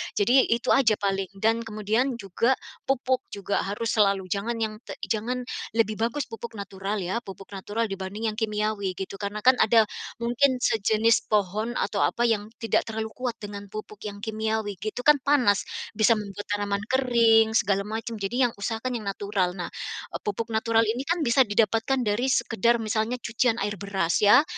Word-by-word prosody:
Jadi 245 +6 +4
itu 235 0 +1
aja 230 -5 +5
paling. 195 -1 -1
Dan 225 +3 +1
kemudian 220 +5 0
juga 230 +4 +1 0.3
pupuk 260 -1 +1
juga 200 0 -2
harus 205 +4 -2
selalu 200 -3 +2
jangan 215 +4 -1
yang 215 -1 -2
te - - -8
jangan 245 +4 -1 0.3
lebih 220 -2 +2
bagus 235 +6 0
pupuk 225 +1 -7
natural 200 0 -4
ya, 185 +6 -1
pupuk 195 -1 -10
natural 205 +4 -2
dibanding 195 +3 -3
yang 215 - -11
kimiawi 210 -3 -1
gitu, 190 +1 -6
karena 205 +2 -3
kan 255 +1 +7
ada 225 0 +6 0.4
mungkin 250 +3 +2
sejenis 225 +2 +2
pohon 210 +3 +1
atau 200 - -1
apa 240 - 0
yang 210 -2 0
tidak 225 - +1
terlalu 220 0 -3
kuat 250 -2 -2
dengan 205 -1 -7
pupuk 215 0 -7
yang 205 -1 -6
kimiawi 220 -2 -2
gitu, 215 +4 -4
kan 300 +1 +6
panas, 250 -9 +3 0.3
bisa 220 +1 +5
membuat 205 -1 -6
tanaman 205 -1 -1
kering, 230 -3 +4
segala 200 -1 +2
macam 225 +2 -4
jadi 245 +6 +1
yang - - -10
usahakan 225 +4 -3
yang 215 - -8
natural. 200 -2 -1
Nah, 175 - -4 0.4
eee, - - -4
pupuk 210 +3 -2
natural 225 +1 +3
ini 225 +4 -1
kan 340 -1 +1
bisa 245 +3 +4
didapatkan 225 +5 +2
dari 215 +5 +1
sekadar 235 -1 +2
misalnya 220 +2 -1
cucian 235 0 0
air 205 +1 -1
beras 195 -4 0
ya, 210 +7 +7
220 Hz, 175 wpm, -26 LUFS, 205-235 Hz, 0.4 s, kan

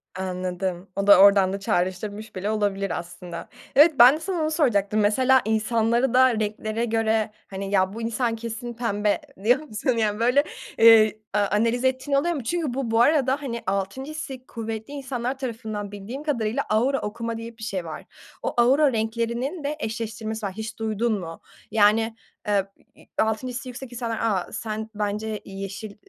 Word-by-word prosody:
Anladım. 185 0 -3
O 200 0 -1
da 200 -2 +9
oradan 195 -1 +6
da 200 - -3
çağrıştırmış 205 +2 -2
bile 195 +3 -2
olabilir 200 -2 -1
aslında. 175 0 -9 0.3
Evet, 300 +3 +7
ben 250 +4 +9
de - - -5
sana 350 0 -2
onu 310 0 0
soracaktım. 215 - +2
Mesela 255 +5 +4
insanları 225 +3 +1
da 255 0 +6
renklere 215 +2 -2
göre, 220 -1 +1 0.2
hani, 195 0 -5
ya, 190 0 +2
"Bu 230 - -6
insan 230 +1 -1
kesin 230 +1 -6
pembe." 210 +1 0 0.2
diyor 245 +6 +4
musun, 265 -5 -4
yani, 215 -3 0
böyle, 250 +5 +4 0.3
eee, 220 -2 +7
a 210 - +2
analiz 230 +4 +1
ettiğin 260 +2 +1
oluyor 345 +5 +1
mu? 275 - -4
Çünkü 315 0 -1
bu, 255 -3 -2
bu 225 +1 +4
arada, 275 0 +3
hani, 235 -4 -4
6'ncı 200 +9 -2
hissi 270 -5 -7
kuvvetli 225 +3 -6
insanlar 260 -2 -3
tarafından 220 -5 -5
bildiğim 210 +8 -7
kadarıyla 245 -3 -1
"aura 250 +6 +2
okuma" 230 +2 -4
diye 230 0 -8
bir 220 - -10
şey 190 -5 -3
var. 160 - -7 0.4
O, - - -1
"aura 265 +3 +4
renklerinin" 235 +8 -2
de 290 +2 -2
eşleştirmesi 220 -2 -4
var, 195 - -3
hiç 220 +2 -7
duydun 220 0 0
mu? 165 -2 -8 0.3
Yani, 225 +1 +3 0.3
eee, 200 -2 +2 0.3
i - - -19
i - - -21
6'ncı 220 +4 -1
hissi 245 +1 -5
yüksek 250 0 -8
insanlar, 230 -2 -3
"A, 200 -6 0
sen 220 -1 -4
bence 210 +1 -2
yeşil 195 +2 -7
225 Hz, 175 wpm, -24 LUFS, 205-250 Hz, 0.4 s, da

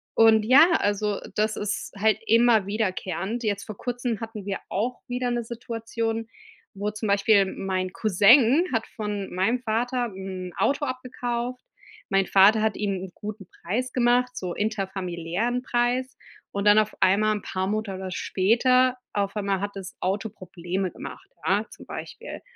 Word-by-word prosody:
und 220 -1 +6
ja, 295 +8 +7
also, 205 0 0 0.2
das 215 +1 +1
ist 210 0 -3
halt 215 +1 +3
immer 230 -2 +4
wiederkehrend. 200 +1 -2
Jetzt 205 -2 -1
vor 215 -3 -8
Kurzem 245 -2 -3
hatten 220 -3 -7
wir 195 - -1
auch 240 +6 -2
wieder 245 0 -2
'ne 240 -1 -1
Situation, 225 -1 -4 0.5
wo 205 +1 -2
zum 215 +1 -4
Beispiel 200 0 +4
mein 185 -1 -3
Cousin 230 - +5
hat 225 - 0
von 210 -3 -4
meinem 200 +7 +1
Vater 245 +2 0
'n 190 -2 -6
Auto 285 +1 +1
abgekauft. 250 -1 -4 0.5
Mein 195 -1 +2
Vater 205 +3 +6
hat 220 -1 0
ihm 205 -1 -1
'n 190 - -8
guten 205 -2 -7
Preis 245 +8 -2
gemacht, 250 0 +2
so 180 -2 -3
interfamiliären 195 +2 -2
Preis 245 +1 0 0.4
und 200 +1 -3
dann 205 +1 +7
auf 215 0 0
einmal 210 +3 +4
'n 210 - -5
paar 185 0 -3
Monate 195 -3 -3
später 250 +8 +2 0.2
auf 200 0 -1
einmal 200 -2 -1
hat 205 0 -2
das 190 -2 -8
Auto 200 +4 -1
Probleme 185 -1 -4
gemacht, - - -9 0.2
ja, 205 +3 +2
zum - - -13
Beispiel. - - -8
215 Hz, 155 wpm, -25 LUFS, 195-240 Hz, 0.5 s, ja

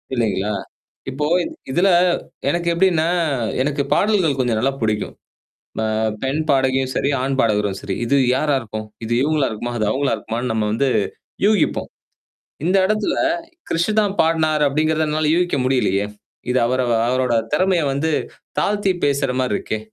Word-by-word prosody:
இல்ங்களா? 105 -3 0 0.6
இப்போ 145 +3 -2 0.5
இதுல, 175 +7 +3 0.6
எனக்கு 170 +3 -1
எப்டின்னா 170 -2 +2 0.6
எனக்கு 140 0 0
பாடல்கள் 190 -9 +2
கொஞ்சம் 120 -4 +1
நல்லா 135 +4 +1
புடிக்கும். 110 -2 -1 0.7
அ - - 0 0.4
பெண் 135 +4 0
பாடகியும் 130 -1 +1
சேரி, 140 - +1
ஆண் 135 +1 -1
பாடகரும் 105 -3 +1
சேரி. 95 - -4
"இது 140 - +2 0.2
யாரா 145 +1 +1
இருக்கும்? 110 -2 -6 0.2
இது 115 - -3
இவுங்களா 150 -1 +1
இருக்குமா? 120 +2 -4
அது 110 - 0
அவுங்களா 135 +1 +1
இருக்குமா"ன்னு! 115 +3 -4
நம்ம 110 -1 0
வந்து 135 +5 +1 0.6
யூகிப்போம். 210 -1 +1 0.8
இந்த 185 +3 +3
எடத்துல, 215 0 0 0.6
"கிரிஷுதான் 205 +4 +1
பாடுனாரு" 155 -2 +2
அப்டிங்கிறத 155 +2 +1
என்னால 155 0 +1
யூகிக்க 175 -4 +1
முடியலையே! 105 -6 +1 0.4
இது 130 - +2
அவரு 130 +1 0 0.2
அவரோட 130 -1 +1 0.2
திறமைய 180 +1 +2
வந்து 155 +4 0 0.5
தாழ்த்தி 205 -2 +1
பேசுற 140 -2 +1
மாரி 125 -5 -1
இருக்கே! 110 - -4
140 Hz, 140 wpm, -20 LUFS, 120-165 Hz, 0.8 s, இதுல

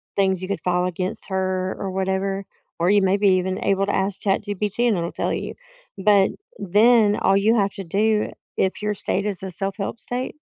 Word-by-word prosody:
things 190 -2 +1
you 185 - -4
could 200 - -3
file 180 0 +1
against 185 +1 -3
her 185 -1 -1
or 195 - -3
whatever, 190 +1 -1 0.3
or 170 +2 +2
you 205 0 +5
may 190 +1 +2
be 205 -1 +3
even 185 +1 +1
able 195 0 +2
to 205 - -1
ask 195 0 -1
ChatGPT, 205 +3 0
and 210 -5 +2
it'll 170 0 -2
tell - - -2
you. - - -4 0.4
But 195 0 +4 0.3
then 210 +2 +4
all 195 -1 +3
you 220 +3 +3
have 200 -3 +1
to 195 - -6
do, 210 +4 +1 0.3
if 190 +2 0
your 210 0 0
state 195 +1 -2
is 195 -3 -3
a 190 - -5
self-help 195 +4 -3
state, 250 +3 -4
195 Hz, 200 wpm, -22 LUFS, 190-205 Hz, 0.4 s, you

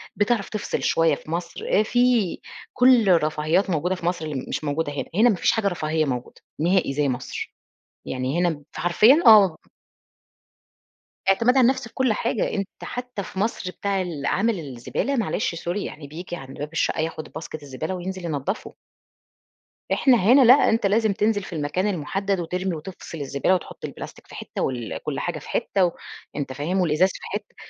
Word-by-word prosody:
بتعرف 210 0 +1
تفصل 215 - -3
شويّة 165 -2 +3
في 155 - -11
مصر، 170 0 -4 0.2
آآ - - +4
في 245 -5 +2 0.3
كل 250 -4 +5
الرفاهيات 160 +3 +2
موجودة 180 +2 0
في 175 - -8
مصر 175 -2 -1
اللي 145 -4 -4
مش - - -3
موجودة 145 +1 -1
هنا، 145 - -3
هنا 225 +5 +5
ما 210 - +2
فيش - - +2
حاجة 220 -3 0
رفاهية 160 -4 0
موجودة 125 -3 -5 0.2
نهائي 175 -2 +2
زي 145 0 +1
مصر. 125 0 -5 0.5
يعني 130 +4 -2
هنا 165 -5 0
فحرفيًا 220 - +4
آه. 200 -7 +8 1.7
اعتماد 230 +7 +4
على - - +6
النفس 260 -1 +1
في - - -19
كل 260 -4 +2
حاجة، 230 +1 -1
أنت 195 -2 -2 0.2
حتّى 245 -4 -5
في 190 - -7
مصر 205 -3 -1
بتاع 200 0 -1
العامل 180 +6 -1
الزبالة 140 - -3
معلش 215 -6 -1
sorry 175 +3 -3
يعني، 155 -7 -6
بييجي 175 +4 -7
عند 135 -4 -10
باب 145 +1 -5
الشقّة 165 0 0
ياخد 160 0 -3
باسكت 155 -1 -7
الزبالة 145 +6 -4
وينزل 185 0 -5
ينضفه. 160 +5 -3 1.2
إحنا 260 -4 +4
هنا 235 +8 +6
لأ، 250 0 +9 0.2
أنت 225 -1 +1
لازم 215 +1 +3
تنزل 210 0 +1
في 190 - -9
المكان 160 +5 -1
المحدد 195 +2 -1
وترمي 180 +1 -2
وتفصل 165 +1 -8
الزبالة، 140 +4 0
وتحط 180 - -6
البلاستيك - - -9
في - - -12
حتّة - - -6
وال 120 -4 -3
كل - - -3
حاجة - - -3
في - - -13
حتّة، 195 -1 +1 0.5
وأنت 140 -3 -3
فاهم 170 +8 0
الإزاز 170 +3 +3
في - - -8
حتّة - - -6
180 Hz, 175 wpm, -24 LUFS, 155-210 Hz, 1.7 s, لأ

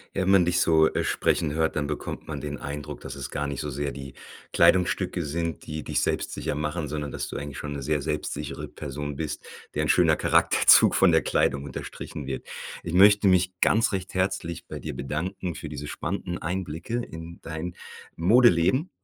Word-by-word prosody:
Wenn 95 0 +1
man 95 -2 +6
dich 90 +1 +1
so, 80 -1 +5
äh, - - 0
sprechen 75 - +1
hört, 80 0 0
dann 75 -1 0
bekommt 75 - -5
man 75 -3 -5
den 75 0 -4
Eindruck, 75 0 -6
dass - - -8
es 70 -3 -6
gar 75 0 -2
nicht 70 0 -4
so 75 - -3
sehr 70 +1 -3
die 70 -1 -8 0.4
Kleidungsstücke 90 -1 +3
sind, 80 +1 -3
die 75 0 -5
dich - - 0
selbstsicher - - -1
machen, 75 +1 -3
sondern 75 -1 -4
dass - - -4
du - - -5
eigentlich 70 -1 -6
schon 75 - -5
'ne 70 -1 -4
sehr 75 +2 0
selbstsichere 75 +1 -4
Person 75 0 -6
bist, 75 +1 -4 0.3
deren - - 0
schöner - - +4
Charakterzug - - +5
von - - +5
der - - +5
Kleidung 70 0 +1
unterstrichen 70 -3 -7
wird. - - -4 0.4
Ich 85 - -5
möchte 100 +1 +6
mich 95 0 +3
ganz 110 -1 +3
recht 95 -1 -3
herzlich 95 -3 -2
bei - - -6
dir - - -5
bedanken 85 +4 -3
für 80 - -7
diese 75 0 -6
spannenden 90 0 -4
Einblicke 90 +4 -4
in 80 +1 -9
dein 80 +2 -5 0.4
Modeleben 105 - +4
80 Hz, 185 wpm, -26 LUFS, 75-90 Hz, 0.4 s, man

